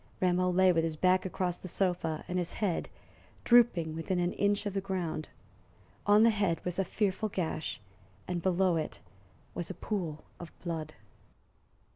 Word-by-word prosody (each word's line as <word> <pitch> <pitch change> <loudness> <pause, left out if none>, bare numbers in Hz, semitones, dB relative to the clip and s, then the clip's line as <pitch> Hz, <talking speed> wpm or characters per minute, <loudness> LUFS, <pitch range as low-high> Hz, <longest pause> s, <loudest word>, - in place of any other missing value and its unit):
Rameau 180 0 +2
lay 185 +1 +5
with 165 -2 +2
his 165 -1 -1
back 185 +3 +3
across 180 -1 -2
the - - -8
sofa 175 -4 -1
and 180 0 -1
his 175 -1 -2
head 200 -6 -1 0.5
drooping 225 -10 +4
within 165 +3 -2
an 175 0 0
inch 205 +1 +1
of 205 - -2
the 195 - -1
ground. 180 -5 -3 0.8
On 205 +1 +7
the 230 - +6
head 200 -6 0
was 180 +1 -2
a - - +3
fearful 210 +2 -1
gash, 165 -4 -3 0.5
and 180 -1 -2
below 185 -1 +2
it 155 - -4 0.5
was 170 -1 -4
a - - -5
pool 170 -8 -3 0.2
of 170 - -8
blood. 160 -3 -4
180 Hz, 165 wpm, -31 LUFS, 165-195 Hz, 0.8 s, On